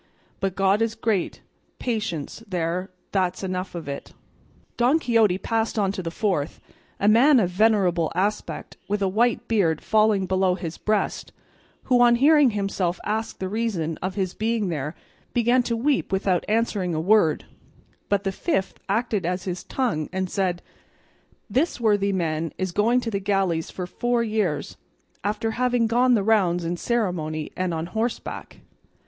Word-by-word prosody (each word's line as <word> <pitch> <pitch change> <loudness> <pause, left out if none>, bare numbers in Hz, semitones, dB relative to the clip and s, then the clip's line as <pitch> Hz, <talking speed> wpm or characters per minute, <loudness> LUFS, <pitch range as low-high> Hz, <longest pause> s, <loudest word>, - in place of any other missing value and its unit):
But 195 -1 -1
God 195 +2 +2
is 225 -1 0
great; 220 -5 -1 0.4
patience 215 - -3
there, 180 +1 -2 0.2
that's 185 -1 0
enough 185 -1 -3
of 170 -3 -6
it." 140 0 -6 0.6
Don 250 +6 +3
Quixote 225 - +3
passed 225 +2 -1
on 200 -2 +2
to 195 - -4
the 170 - -4
fourth, 170 -5 -1 0.4
a 200 - +1
man 250 +6 +6
of 185 -5 +1
venerable 185 -5 +2
aspect 200 +3 -2
with 205 0 -1
a - - +2
white 235 +4 +1
beard 175 -9 +2
falling 215 -3 +2
below 185 0 +2
his 170 -3 -6
breast, 215 -1 -1 0.5
who 250 -2 +3
on 240 -1 +6
hearing 290 +2 +5
himself 195 -4 -1
asked 220 +2 -2
the 190 - -2
reason 190 -7 -2
of 185 +1 -3
his 190 -3 -1
being 220 -2 -1
there 150 -1 -3 0.4
began 240 +1 +3
to 235 -1 -2
weep 275 0 0
without 190 -2 +1
answering 210 -6 0
a - - 0
word, 170 -3 +3 0.6
but 200 -1 +1
the 195 - 0
fifth 195 - -2
acted 215 -1 0
as 180 +2 -2
his 180 -2 -4
tongue 225 - -1
and 185 -1 -2
said, 185 -3 -1 0.8
"This 260 +8 0
worthy 205 -3 +2
man 165 -3 -1
is 185 -1 -2
going 230 +7 +2
to 230 - -3
the 200 - -1
galleys 190 -4 0
for 180 - -5
four 240 +6 0
years, 210 -10 -1 0.5
after 210 +2 -1
having 245 0 +1
gone 245 +2 +3
the 205 - +1
rounds 185 -5 +2
in 170 +1 -1
ceremony 175 -8 -2
and 185 -1 -1
on 160 0 -2
horseback." 225 +6 -4
200 Hz, 160 wpm, -24 LUFS, 180-225 Hz, 0.8 s, man